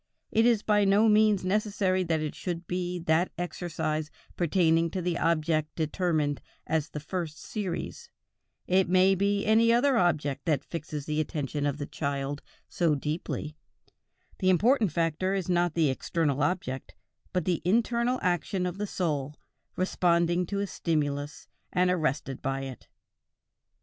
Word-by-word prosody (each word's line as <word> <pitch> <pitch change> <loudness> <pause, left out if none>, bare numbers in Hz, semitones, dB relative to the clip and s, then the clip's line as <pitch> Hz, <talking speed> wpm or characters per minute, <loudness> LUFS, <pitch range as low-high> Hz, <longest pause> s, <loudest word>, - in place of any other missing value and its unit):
It 225 +2 +4
is 230 -3 +3
by 210 -1 +3
no 200 +3 +4
means 210 -3 +4
necessary 195 -1 +1
that 160 -2 0
it 155 -1 -3
should 175 -1 -5
be 180 0 -2
that 165 +1 +1
exercise 165 -3 -3 0.3
pertaining 165 -1 +2
to 185 - -3
the 175 -1 -1
object 155 -2 +1
determined 155 -3 0 0.2
as 155 -1 -1
the 150 - -5
first 160 0 -4
series; 210 - -5 0.6
it 185 -1 +2
may 185 +1 +5
be 200 +1 +1
any 225 +2 +5
other 245 +2 +3
object 145 -6 0
that 150 -4 +1
fixes 150 -3 -5
the 150 0 0
attention 145 -1 -2
of 145 0 -2
the 145 - -4
child 140 -1 -3 0.3
so 165 -4 +1
deeply; 150 +1 -4 0.8
the 185 - +2
important 215 - +3
factor 165 +4 0
is 190 -3 -2
not 175 -2 +1
the 160 -5 +3
external 145 0 -1
object, 145 -4 -2 0.4
but 180 -3 -1
the 175 -3 0
internal 235 +6 +2
action 180 +1 0
of 180 +2 -4
the 210 - -2
soul, 150 -7 -2 0.4
responding 175 -1 +1
to 200 - -3
a - - 0
stimulus, 145 -5 -2 0.2
and 180 0 +2
arrested 150 -6 -1
by 135 0 -2
it. 135 -2 -8
170 Hz, 150 wpm, -28 LUFS, 150-190 Hz, 0.8 s, may